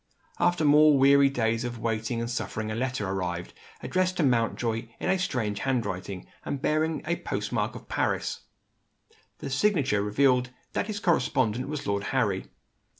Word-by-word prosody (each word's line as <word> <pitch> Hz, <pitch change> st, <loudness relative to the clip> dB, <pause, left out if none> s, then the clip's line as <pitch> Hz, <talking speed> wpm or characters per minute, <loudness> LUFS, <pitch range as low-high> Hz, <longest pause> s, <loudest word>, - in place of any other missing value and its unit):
After 175 Hz, -3 st, +2 dB
more 150 Hz, 0 st, +6 dB
weary 140 Hz, +1 st, +6 dB
days 115 Hz, -3 st, 0 dB
of 120 Hz, -1 st, -4 dB
waiting 115 Hz, +1 st, -2 dB
and 115 Hz, -, -2 dB
suffering 110 Hz, -2 st, -3 dB
a -, -, -2 dB
letter 125 Hz, -4 st, -2 dB
arrived, 90 Hz, -2 st, -3 dB, 0.3 s
addressed 185 Hz, 0 st, 0 dB
to 170 Hz, -, +2 dB
Mountjoy 115 Hz, -2 st, 0 dB
in -, -, 0 dB
a 190 Hz, -, +1 dB
strange 115 Hz, -, -1 dB
handwriting, 100 Hz, -7 st, -2 dB, 0.2 s
and 140 Hz, -, -3 dB
bearing 155 Hz, +3 st, 0 dB
the 170 Hz, +2 st, 0 dB
post -, -, -4 dB
mark -, -, -1 dB
of -, -, -10 dB
Paris. -, -, -1 dB, 1.0 s
The 140 Hz, -3 st, -6 dB
signature 135 Hz, -, +2 dB
revealed 125 Hz, +4 st, +2 dB, 0.2 s
that -, -, -1 dB
his 210 Hz, -2 st, -3 dB
correspondent 130 Hz, -, +1 dB
was 150 Hz, -1 st, -4 dB
Lord 100 Hz, 0 st, -1 dB
Harry. -, -, 0 dB
125 Hz, 155 wpm, -27 LUFS, 110-150 Hz, 1.0 s, more